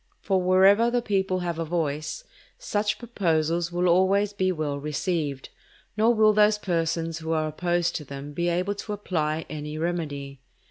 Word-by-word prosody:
For 190 -2 0
wherever 190 +5 +5
the 240 0 0
people 190 -3 0
have 170 -2 -3
a - - 0
voice, 160 - -2 0.3
such 215 - -1
proposals 170 -7 0
will 175 +1 +1
always 195 +3 +3
be 185 -2 +1
well 150 -4 -2
received, 150 -1 -2 0.5
nor 220 +2 +4
will 215 -2 +4
those 210 0 +4
persons 165 -3 -1
who 160 0 -2
are 155 -1 0
opposed 175 +2 -1
to 150 - -7
them 140 +1 -8
be 175 +3 0
able 180 +4 0
to 205 +1 -6
apply 160 -6 -2
any 150 0 -6
remedy. 145 -5 -4
175 Hz, 165 wpm, -26 LUFS, 155-200 Hz, 0.5 s, wherever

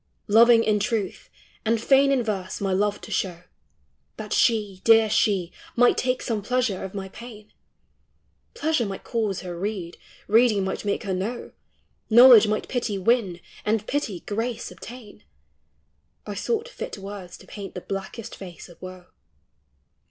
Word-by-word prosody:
Loving 230 +2 +6
in 210 -2 +2
truth, 210 -2 -3 0.3
and 225 0 +1
fain 275 +4 +4
in 265 -3 +2
verse 195 -4 -3
my 195 -1 -1
love 205 +2 0
to - - -10
show, 180 -3 -2 0.7
That - - -5
she, 210 -5 +1
dear 225 -1 +5
she, 195 -5 +1 0.2
might 245 0 +5
take 255 0 -1
some 220 -3 -2
pleasure 235 -3 -1
of 190 +1 -7
my 190 -1 -5
pain, 215 -1 -12 0.5
— - - -44
Pleasure 315 - 0
might 195 -1 -6
cause 215 -5 -2
her 180 -2 -6
read, 185 -2 -4 0.3
reading 220 -2 +4
might 190 +2 -4
make 200 +3 -1
her 195 -3 -2
know, 210 +7 -4 0.6
Knowledge 235 -1 +9
might 215 0 -1
pity 235 -5 -2
win, 195 -4 +1 0.2
and 215 0 0
pity 220 -11 -2
grace 225 +3 -4
obtain, 235 - -12 0.5
— 70 -1 -45
I 210 - -5
sought 450 - -2
fit - - -7
words 195 -2 -8
to - - -16
paint 200 -3 -9
the 180 - -5
blackest 195 +4 -6
face 180 -3 -10
of 175 - -17
woe; 185 - -6
THOUGHT: 185 - -10
POETRY: - - -32
BOOK*. - - -46
210 Hz, 165 wpm, -24 LUFS, 190-235 Hz, 0.7 s, Knowledge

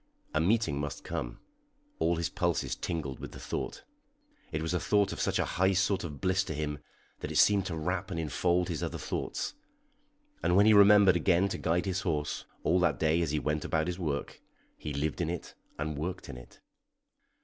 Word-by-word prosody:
A 80 - +2
meeting 90 -6 +2
must 75 -1 -4
come; - - -4 0.6
all 85 +1 +2
his 85 -1 -1
pulses - - -1
tingled 75 -6 -4
with - - -8
the - - -9
thought. - - -4 0.7
It 80 0 -2
was 80 - -1
a 90 - +1
thought 105 +2 +2
of - - -7
such - - +1
a - - +1
high 95 +2 +2
sort 95 +1 +1
of 75 -5 -6
bliss 95 +3 +2
to 80 - -4
him 75 -1 -3 0.4
that - - -5
it - - -5
seemed 100 -2 +5
to 85 - -3
wrap 90 +4 -2
and 85 -4 -3
enfold 85 +3 +1
his 80 -2 -3
other 85 - -3
thoughts; - - -3 0.9
and 90 - +2
when 100 +2 +6
he 110 - +7
remembered 100 -2 +7
again 95 0 +3
to - - -3
guide 85 +4 +1
his 95 -1 -1
horse 75 -4 -2 0.2
all 90 +3 +3
that 90 - +2
day 80 +1 +2
as 85 - 0
he 75 - 0
went 75 +1 -1
about 80 -1 0
his 90 +1 -3
work 75 -5 -3 0.3
he 75 - -6
lived 75 +4 -2
in 85 - 0
it 85 0 -5 0.2
and 75 -1 -3
worked 90 +4 -4
in - - -6
it. 60 - -14
85 Hz, 205 wpm, -30 LUFS, 75-95 Hz, 0.9 s, he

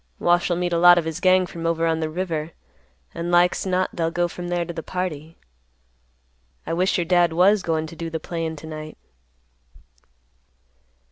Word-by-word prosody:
Wash'll 175 0 +2
meet 175 0 -2
a 170 - +2
lot 175 0 +8
of 170 - 0
his 160 -1 -4
gang 185 0 +4
from 165 -1 -5
over 165 0 0
on 165 -1 +1
the 160 -1 -2
river, 165 -2 -4 0.6
and 170 +1 -4
like's 175 +2 +3
not 185 0 +1
they'll 165 -2 0
go 175 +1 0
from 175 +1 -7
there 175 -1 -1
to 170 - -6
the 165 - -5
party. 165 -3 -5 1.3
I 165 - -3
wish 185 +4 +1
your 175 - -1
dad 175 -1 +3
was 190 +4 +4
goin' 160 -3 -1
to 160 - -10
do 165 +1 -5
the 160 0 -4
playin' 165 -1 -4
to 155 - -11
night." 155 -1 -8
170 Hz, 185 wpm, -23 LUFS, 160-175 Hz, 1.3 s, lot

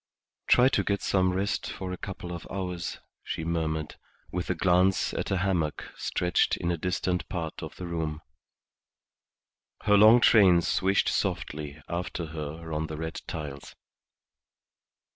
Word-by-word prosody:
"Try 125 +1 +6
to - - +1
get 100 -1 -1
some 95 -1 +2
rest 95 +2 -1
for 95 -1 -5
a 90 - -4
couple 95 -2 -7
of 85 - -7
hours," 90 -3 -4 0.3
she 80 - -4
murmured, 80 -2 -2 0.3
with 90 0 -3
a 90 - +1
glance 90 +2 +3
at - - -3
a 95 - +1
hammock 90 -5 -1
stretched 90 0 +1
in 85 - -1
a - - +1
distant 90 +1 -1
part 80 -3 -4
of - - -7
the 90 - -7
room. 80 -3 -3 1.6
Her 105 0 +5
long 110 +4 +8
train 95 -7 +6
swished 95 +3 +2
softly 75 -1 -2
after 85 0 -3
her 80 +1 -6
on 80 +1 -1
the 80 - -6
red 80 +1 -5
tiles. 70 -3 -6
85 Hz, 145 wpm, -28 LUFS, 80-95 Hz, 1.6 s, long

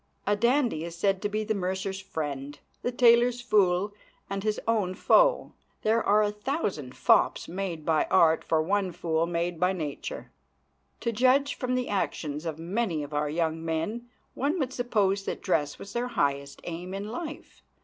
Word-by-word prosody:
A 205 - +2
dandy 235 - +2
is 170 0 -6
said 195 +1 +1
to 205 - -1
be 215 +1 -1
the 220 +1 -1
mercer's 190 0 -2
friend, 145 -6 -5 0.2
the 245 - -1
tailor's 240 0 +5
fool, 205 -4 +2 0.4
and 195 0 -2
his 215 -1 0
own 205 -5 +1
foe. - - +3 0.3
There 225 +2 +2
are 210 +1 +4
a 205 - +1
thousand 210 - -3
fops - - +3
made 175 -4 -4
by 160 -2 +2
art 165 -3 +4
for 160 -1 +1
one 190 +1 0
fool 165 0 0
made 170 0 -2
by 180 +1 +3
nature. 155 -6 -5 0.7
To 235 - 0
judge 260 +5 +3
from 255 -1 -2
the 250 0 -1
actions 160 -5 -2
of 160 -2 -3
many 170 -1 -1
of 145 +1 -8
our 145 0 0
young 160 +1 -1
men 185 +10 -3 0.2
one 290 +7 0
would 265 -5 -2
suppose 205 -5 +1
that - - -4
dress 150 -6 0
was 200 - -10
their 240 +1 -1
highest 140 - -1
aim 175 +3 -5
in 200 +2 -5
life. 305 +6 -7
195 Hz, 175 wpm, -28 LUFS, 165-230 Hz, 0.7 s, tailor's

